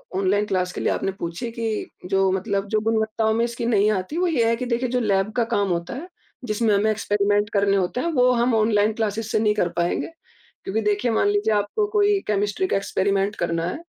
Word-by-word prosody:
online 195 +2 +1
class 185 -3 -1
के - - -5
लिए - - +1
आपने 195 - -2
पूछी 170 +8 -4
कि 225 -2 -3 0.2
जो 195 0 +2
मतलब 195 +1 -1
जो 215 - +2
गुणवत्ताओं 220 0 0
में 230 +1 +1
इसकी 235 0 -4
नहीं 215 -3 +3
आती, 195 - -3
वो 360 +1 +2
ये 275 -9 +2
है 230 - +2
कि 250 - -4
देखिए 240 +1 -1
जो 250 - 0
लैब 200 -2 +1
का 240 - +3
काम 200 -1 +1
होता 170 -1 -2
है, 310 +7 -7 0.4
जिसमें 215 -1 +1
हमें 210 +2 +2
एक्सपेरिमेंट 205 0 +1
करने 200 -1 +2
होते 190 +6 -1
हैं, - - -1
वो 250 -2 +4
हम 240 0 +2
ऑनलाइन 215 -1 +2
क्लासेस 220 0 -2
से - - +2
नहीं 215 -1 +2
कर 180 -4 +1
पाएँगे 170 0 0 0.6
क्योंकि 215 +3 -1
देखिए 210 +3 0
मान 225 - +2
लीजिये 410 - +1
आपको 205 - -1
कोई 410 -1 +3
केमिस्ट्री 205 - 0
का - - +1
एक्सपेरिमेंट 195 +1 0
करना 170 -1 -1
है, 290 - -5
215 Hz, 220 wpm, -23 LUFS, 200-235 Hz, 0.6 s, वो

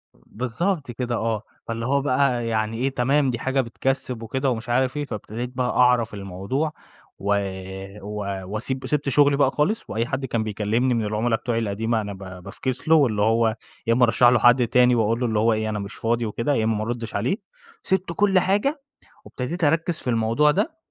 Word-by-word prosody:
بالضبط 130 - -3
كده 120 0 -3
آه، 115 -2 -1 0.2
فاللي 115 0 -3
هو 140 +2 +2
بقى 130 -3 +1
يعني 110 0 -1
إيه 130 +3 +1
تمام 135 +2 +2
دي 120 -2 -2
حاجة 130 +2 +1
بتكَسّب 125 0 -2
وكده 130 +4 -1
ومش 115 -1 -3
عارف 130 +3 +1
إيه، 145 - -1
فابتديت 115 +2 -5
بقى 125 -1 +1
أعرف 125 -3 +3
الموضوع 100 - -3 0.5
و 100 +1 +1 0.7
و 100 -2 -4
وأسيب 120 +7 -3
وسِبت 150 -1 -1
شغلي 140 +1 +4
بقى 135 -2 +3
خالص، 190 +12 0
وأي 115 +2 -1
حد 130 +2 -2
كان 115 -3 -1
بيكلّمني 110 +4 0
من 115 -2 0
العُملا 110 +2 0
بتوعي 115 0 -2
القديمة 110 +1 -1
أنا 105 -1 -5
ب 95 -2 -10
بافكس 130 - -4
له، 160 - +6
واللي 120 -9 +3
هو 115 +1 +3 0.3
يا 115 - +4
إمّا 125 +2 +3
أرشّح 115 +2 +4
له 120 -1 +3
حد 120 +1 +5
تاني 125 0 +4
وأقول 115 +1 +1
له 125 - 0
اللي 110 -3 +1
هو 115 +1 +3
إيه، 110 0 -1
أنا 105 - -2
مش 100 0 -6
فاضي 115 +1 0
وكده، 115 +6 -1
يا 110 - +1
إمّا 110 0 +1
ما 105 - -2
أرُدّش 115 0 -4
عليه، 120 - 0 0.5
سِبت 190 -2 0
كل 195 -1 +4
حاجة 210 - +1 0.4
وابتديت 160 +7 -4
أرَكّز 165 +2 +2
في 125 - -4
الموضوع 115 +6 +3
ده، 315 - -1
120 Hz, 200 wpm, -23 LUFS, 110-135 Hz, 0.7 s, له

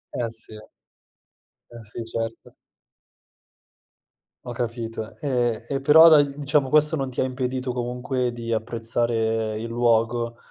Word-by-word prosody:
Eh, 120 -2 -2
sì. 115 -1 -14 1.2
Eh, 120 -1 -11
sì, 110 +2 -7
certo. 115 0 -5 1.9
Ho 120 - -5
capito. 115 -2 -5
E 120 -6 -1
e 140 -1 -1
però 160 +4 +8
dai, 145 -3 +4
diciamo 145 -1 +1
questo 150 +2 +3
non 135 -2 -2
ti 125 - -3
ha - - +2
impedito 130 0 -3
comunque 125 +1 -2
di 115 -1 -6
apprezzare 115 -1 -1
il 115 +2 -5
luogo 115 0 +1
120 Hz, 125 wpm, -24 LUFS, 115-130 Hz, 1.9 s, però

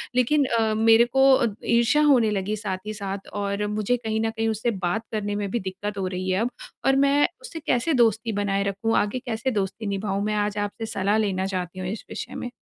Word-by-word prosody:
लेकिन 270 +3 +3
अ, 220 -1 +2
मेरे 225 +1 +6
को 270 +2 +4
अ, 260 -3 +2 0.2
ईर्ष्या 235 +5 +3
होने 255 -7 +5
लगी 205 +1 -1
साथ 200 -3 -3
ही 215 - -3
साथ। 200 -1 -5
और 200 0 -2
मुझे 215 +3 0
कहीं 220 -2 -2
न 225 - +1
कहीं 225 0 -2
उससे 220 +2 0
बात 190 +2 -2
करने 205 -2 -2
में 205 -1 -2
भी 235 - 0
दिक्कत 200 +2 -5
हो 190 -1 -1
रही 185 0 -3
है, 185 +1 +1
अब। 240 - +1 0.4
और 270 - +4
मैं 280 +1 +4
उसे 470 -10 -7
कैसे 255 +6 +1
दोस्ती 225 -2 +2
बनाए 200 -1 0
रखूँ? 200 +3 -1
आगे 210 +5 0
कैसे 235 +2 -1
दोस्ती 205 +1 -2
निभाऊँ? 200 0 -2
मैं 215 0 0
आज 205 0 -1
आपसे 205 +2 -3
सलाह 205 0 0
लेना 190 -3 0
चाहती 185 -1 -4
हूँ, 185 - -3
इस 210 +3 -5
विषय - - -6
में। 245 - -4
215 Hz, 225 wpm, -24 LUFS, 200-235 Hz, 0.4 s, मेरे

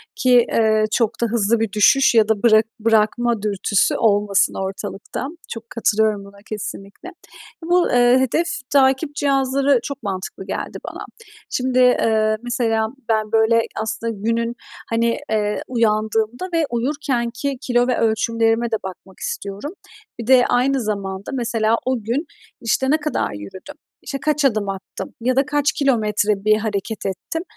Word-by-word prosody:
ki, 250 - +4
eee, 215 -1 +3
çok 230 -2 +2
da - - +3
hızlı 230 0 +1
bir 225 -2 -1
düşüş 245 +6 +4
ya 220 -2 +5
da 215 -1 0
bırak 220 -2 +5
bırakma 225 +1 +2
dürtüsü 205 -1 +1
olmasın 205 -3 +2
ortalıkta. 200 +5 -6 0.2
Çok 230 0 -8
katılıyorum 215 -2 +1
buna, 200 0 -15
kesinlikle. 210 - -7 0.5
Bu, 350 +1 +2
eee, 245 +1 +4
hedef 265 +7 +1 0.2
takip 275 +2 +2
cihazları 275 -1 +2
çok 280 -3 -6
mantıklı 190 -1 -5
geldi - - -5
bana. - - -8 0.4
Şimdi, 255 0 0
eee, 220 -3 +3
mesela 230 -3 0 0.2
ben 215 -1 0
böyle 225 +1 +4 0.2
aslında 225 +1 -3
günün, 230 +3 -1 0.3
hani, 230 0 +1
eee, 210 -1 0
uyandığımda 220 - 0
ve 330 -2 +2
uyurkenki 255 0 -2
kilo 245 -1 +1
ve 250 - +1
ölçümlerime 225 +1 +1
de - - +2
bakmak 190 0 -10
istiyorum. 295 - -5 0.5
Bir 230 - -6
de 255 -1 +6
aynı 260 +2 +2
zamanda, 200 -1 -4
mesela, 230 -3 +1
o 255 -3 -1
gün, 245 +9 -1 0.4
işte, 265 +3 0
ne 310 - +4
kadar 305 0 -2
yürüdüm? 185 - -9 0.3
İşte, 275 - -4
kaç 300 -1 +1
adım 215 -6 +1
attım? 195 -1 -7
Ya 255 +2 +1
da 270 +1 +3
kaç 290 0 +1
kilometre 210 -6 0
bir 215 0 +5
hareket 215 0 -3
ettim? 195 - -4
230 Hz, 145 wpm, -20 LUFS, 215-260 Hz, 0.5 s, de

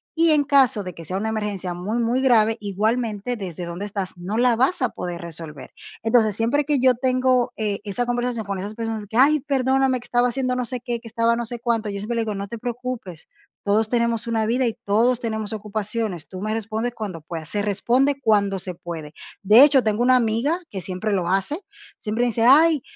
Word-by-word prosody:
y 330 0 +4
en 295 -1 +4
caso 265 -6 +3
de 180 - -6
que 165 -1 -11
sea 185 - -4
una 220 +2 -2
emergencia 205 -5 -3
muy 205 +7 -3
muy 240 +3 +1
grave, 225 -3 +4
igualmente 215 +3 -1
desde 180 -3 -6
donde 170 +4 -5
estás 195 -2 -4
no 195 +5 -4
la 245 -1 +3
vas 265 +5 +1
a 250 - +2
poder 175 -1 -6
resolver. 155 -5 -8 0.3
Entonces, 225 -3 +3
siempre 250 +6 +1
que 290 -1 +2
yo 255 -1 +4
tengo, 255 0 +1
eh, 210 -2 -2
esa 225 +5 -2
conversación 240 -2 -2
con 200 -1 -3
esas 205 +3 -6
personas, 225 -1 -3
de - - -12
que: 220 - -9
"Ay, 300 +4 +5
perdóname, 265 -2 +1
que - - -15
estaba 245 0 +2
haciendo 255 0 -1
no 250 - -1
sé 250 0 -3
qué, 240 -2 -3
que 230 - -11
estaba 230 +1 +1
no 235 - -2
sé 240 +1 -5
cuánto", 230 -2 -1
yo 200 0 -4
siempre 220 +4 -3
le 230 - +1
digo: 215 -2 -3
"No 200 0 -5
te 235 - -5
preocupes, 245 -8 -6 0.4
todos 210 +2 +2
tenemos 235 -1 0
una 225 -1 0
vida 250 +3 +1
y 225 - -1
todos 235 +4 +2
tenemos 220 -2 -3
ocupaciones, 210 -4 -3
tú 185 0 -8
me 215 +1 -2
respondes 225 +2 -3
cuando 195 -7 -6
puedas", 160 0 -7
se 205 - -1
responde 245 +8 +1
cuando 200 -4 +2
se 180 -1 -4
puede. 160 -3 -8 0.3
De 215 +7 +8
hecho, 280 -3 +6
tengo 215 +2 +1
una 255 +1 +5
amiga 245 +9 +1
que 190 -2 -5
siempre 190 +4 -3
lo 180 -3 0
hace, 195 - 0 0.4
siempre 225 +2 -1
dice: 230 -1 0
"Ay, 305 +2 +6
225 Hz, 220 wpm, -22 LUFS, 200-250 Hz, 0.4 s, De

